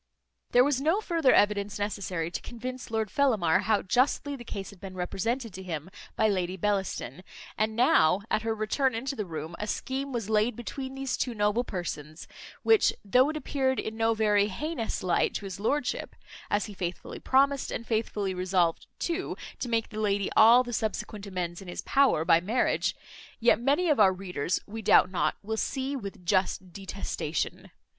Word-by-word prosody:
There 245 Hz, -, +6 dB
was 275 Hz, -1 st, +1 dB
no 325 Hz, +8 st, +2 dB
farther 330 Hz, -10 st, +2 dB
evidence 205 Hz, 0 st, +2 dB
necessary 190 Hz, -5 st, -3 dB
to -, -, -4 dB
convince 250 Hz, +1 st, -7 dB
Lord 220 Hz, -3 st, -1 dB
Fellamar 215 Hz, -, +3 dB
how 215 Hz, -2 st, +2 dB
justly 265 Hz, +6 st, +1 dB
the 245 Hz, -, -9 dB
case 200 Hz, -4 st, -6 dB
had 200 Hz, -, -16 dB
been 190 Hz, -1 st, -8 dB
represented 225 Hz, +6 st, -2 dB
to 190 Hz, -, -7 dB
him 175 Hz, -1 st, -5 dB, 0.2 s
by 220 Hz, -, +3 dB
Lady 185 Hz, -2 st, -1 dB
Bellaston; 190 Hz, -, -2 dB, 0.3 s
and 220 Hz, 0 st, 0 dB
now, 200 Hz, -7 st, +4 dB
at -, -, +2 dB
her 225 Hz, 0 st, -1 dB
return 225 Hz, +4 st, 0 dB
into 265 Hz, +4 st, -3 dB
the 210 Hz, -5 st, -4 dB
room, 160 Hz, 0 st, -6 dB
a 210 Hz, -, -3 dB
scheme 270 Hz, +5 st, -3 dB
was 235 Hz, -5 st, -3 dB
laid 215 Hz, +2 st, +2 dB
between 265 Hz, +2 st, -6 dB
these 270 Hz, -1 st, -2 dB
two 245 Hz, -3 st, -2 dB
noble 210 Hz, +3 st, +1 dB
persons, 165 Hz, -6 st, -6 dB, 0.4 s
which, 445 Hz, -2 st, +5 dB
though 250 Hz, +8 st, +4 dB
it 310 Hz, -, -3 dB
appeared 265 Hz, -3 st, 0 dB
in 220 Hz, -, -4 dB
no 225 Hz, 0 st, +2 dB
very 210 Hz, -2 st, +3 dB
heinous 230 Hz, -, -3 dB
light 180 Hz, -2 st, +1 dB
to 205 Hz, -, -4 dB
his 190 Hz, -1 st, -6 dB
lordship 285 Hz, +8 st, -1 dB, 0.3 s
(as 205 Hz, -, +1 dB
he 210 Hz, -, -8 dB
faithfully 180 Hz, -2 st, -5 dB
promised, 275 Hz, +1 st, +2 dB
and 230 Hz, -, -4 dB
faithfully 215 Hz, -4 st, -1 dB
resolved 180 Hz, -2 st, 0 dB
too, 345 Hz, +2 st, -2 dB, 0.2 s
to 245 Hz, -, -3 dB
make 225 Hz, -1 st, 0 dB
the 215 Hz, -, -6 dB
lady 200 Hz, -2 st, 0 dB
all 235 Hz, +3 st, +8 dB
the 240 Hz, -1 st, -6 dB
subsequent 215 Hz, -1 st, -3 dB
amends 180 Hz, -2 st, -4 dB
in 190 Hz, -, -11 dB
his 175 Hz, -, -5 dB
power 270 Hz, -, +3 dB
by 165 Hz, -1 st, +5 dB
marriage), 220 Hz, +8 st, +1 dB, 0.4 s
yet 235 Hz, 0 st, +4 dB
many 285 Hz, +8 st, +2 dB
of 300 Hz, -7 st, +3 dB
our 195 Hz, -3 st, +7 dB
readers, 180 Hz, -4 st, -2 dB
we 220 Hz, +2 st, -7 dB
doubt 185 Hz, -, +5 dB
not, 155 Hz, -4 st, 0 dB
will 220 Hz, +2 st, -3 dB
see 270 Hz, +4 st, -2 dB
with 200 Hz, -6 st, -7 dB
just 185 Hz, -1 st, 0 dB
detestation. 190 Hz, -5 st, -4 dB
215 Hz, 180 wpm, -28 LUFS, 185-250 Hz, 0.4 s, all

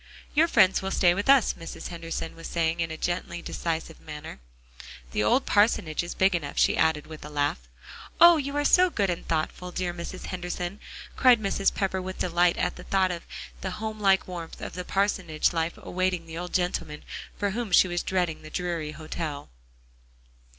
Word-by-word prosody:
"Your 315 Hz, +3 st, +5 dB
friends 195 Hz, -, +4 dB
will 190 Hz, -, -3 dB
stay 180 Hz, -2 st, +4 dB
with 200 Hz, +7 st, -3 dB
us," 275 Hz, -5 st, +6 dB
Mrs. 165 Hz, -, -8 dB
Henderson 165 Hz, -1 st, -5 dB
was 165 Hz, 0 st, -8 dB
saying 165 Hz, 0 st, 0 dB
in 165 Hz, -1 st, 0 dB
a 160 Hz, -, -6 dB
gently 175 Hz, 0 st, -2 dB
decisive 165 Hz, -1 st, -4 dB
manner, 150 Hz, -, -8 dB, 0.7 s
"the 105 Hz, -, 0 dB
old 255 Hz, -, +3 dB
parsonage 205 Hz, -7 st, +2 dB
is 175 Hz, 0 st, -6 dB
big 190 Hz, +1 st, +3 dB
enough," 150 Hz, -5 st, -3 dB
she -, -, +4 dB
added 160 Hz, -2 st, +2 dB
with 155 Hz, -1 st, -10 dB
a 150 Hz, -, -8 dB
laugh. 145 Hz, -, -1 dB, 0.5 s
"Oh! 340 Hz, 0 st, +9 dB
you 280 Hz, -1 st, -3 dB
are 290 Hz, -, +1 dB
so 365 Hz, +4 st, +6 dB
good 200 Hz, -, 0 dB
and 170 Hz, -, -5 dB
thoughtful, 165 Hz, +3 st, -2 dB
dear 180 Hz, -1 st, -2 dB
Mrs. 175 Hz, +2 st, -7 dB
Henderson," 180 Hz, +1 st, -4 dB, 0.4 s
cried 250 Hz, -3 st, +6 dB
Mrs. 195 Hz, -1 st, +1 dB
Pepper 190 Hz, -2 st, -1 dB
with 185 Hz, 0 st, -6 dB
delight 175 Hz, 0 st, +2 dB
at 180 Hz, -, -1 dB
the -, -, -9 dB
thought 190 Hz, -1 st, +2 dB
of 170 Hz, -1 st, -6 dB, 0.3 s
the -, -, -4 dB
homelike 210 Hz, -3 st, +1 dB
warmth 170 Hz, -3 st, -7 dB
of -, -, -6 dB
the 180 Hz, -, -5 dB
parsonage 185 Hz, -5 st, 0 dB
life 165 Hz, 0 st, -1 dB
awaiting 185 Hz, -2 st, -2 dB
the 160 Hz, 0 st, -9 dB
old 175 Hz, +1 st, -5 dB
gentleman, 175 Hz, -4 st, -1 dB, 0.3 s
for 205 Hz, -1 st, 0 dB
whom 230 Hz, -1 st, -3 dB
she 185 Hz, -, +6 dB
was 175 Hz, -1 st, -1 dB
dreading 180 Hz, -4 st, -1 dB
the 155 Hz, -, -10 dB
dreary 170 Hz, -3 st, -3 dB
hotel. 155 Hz, -1 st, -5 dB
175 Hz, 185 wpm, -27 LUFS, 165-195 Hz, 0.7 s, Oh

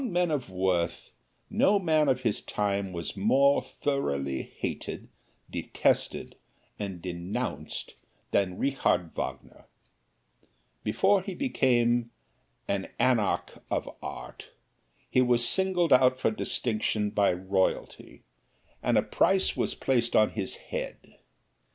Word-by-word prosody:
Among 235 Hz, -8 st, -3 dB
men 175 Hz, -1 st, +2 dB
of 140 Hz, -8 st, -2 dB
worth, 90 Hz, -2 st, -1 dB, 0.4 s
no 205 Hz, +1 st, +3 dB
man 155 Hz, -6 st, +2 dB
of 130 Hz, -1 st, +1 dB
his 115 Hz, -5 st, 0 dB
time 100 Hz, -2 st, -1 dB
was 85 Hz, -2 st, -5 dB
more 135 Hz, +8 st, +4 dB
thoroughly 70 Hz, -, -2 dB
hated, -, -, -6 dB, 0.4 s
detested -, -, 0 dB, 0.5 s
and 95 Hz, -4 st, -5 dB
denounced 90 Hz, +1 st, -4 dB, 0.4 s
than 95 Hz, -2 st, +1 dB
Richard 90 Hz, -11 st, +1 dB
Wagner. -, -, -6 dB, 1.2 s
Before 190 Hz, -, +3 dB
he 190 Hz, -1 st, -6 dB
became 120 Hz, -, +2 dB, 0.6 s
an -, -, -1 dB
anarch 115 Hz, -6 st, +1 dB
of -, -, -1 dB
art, -, -, -8 dB, 0.6 s
he 130 Hz, -, +3 dB
was 120 Hz, -1 st, +3 dB
singled 185 Hz, -5 st, +3 dB
out 130 Hz, 0 st, +5 dB
for 110 Hz, -, +2 dB
distinction 110 Hz, -2 st, -1 dB
by 100 Hz, -2 st, +3 dB
royalty 95 Hz, +1 st, -2 dB, 0.6 s
and -, -, +2 dB
a -, -, +4 dB
price 190 Hz, 0 st, +2 dB
was -, -, -1 dB
placed 120 Hz, -3 st, +1 dB
upon 110 Hz, -, +5 dB
his 100 Hz, -3 st, -3 dB
head. -, -, -5 dB
120 Hz, 115 wpm, -28 LUFS, 95-140 Hz, 1.2 s, out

